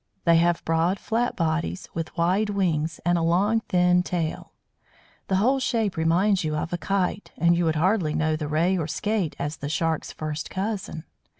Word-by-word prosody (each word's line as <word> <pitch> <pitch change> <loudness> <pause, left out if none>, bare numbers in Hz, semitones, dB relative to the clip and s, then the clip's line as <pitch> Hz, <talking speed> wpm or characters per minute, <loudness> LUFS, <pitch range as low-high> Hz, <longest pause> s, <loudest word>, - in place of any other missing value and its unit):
They 170 -1 +5
have 170 0 +2
broad, 165 +4 +1
flat 235 +5 -1
bodies, 165 +2 -1
with 165 -2 -5
wide 185 +5 +2
"wings," 165 -6 0
and 175 0 +3
a - - -1
long 190 +7 +2
thin 180 0 +4
tail. 170 -3 -3 0.8
The 190 - +1
whole 255 +8 +3
shape 225 -6 0
reminds 180 +5 +2
you 155 -1 -1
of 160 +3 -3
a - - 0
kite, 195 +1 -1
and 170 +2 +4
you 170 0 +1
would 160 -1 +1
hardly 175 -1 +1
know 155 0 +1
the 155 -1 -4
Ray 165 +5 +1
or 165 -5 -2
Skate 205 -1 -1
as 145 +2 -4
the 140 - -5
Shark's 160 0 -1
first 155 -1 -5
cousin. 190 -5 -4
170 Hz, 185 wpm, -25 LUFS, 160-195 Hz, 0.8 s, They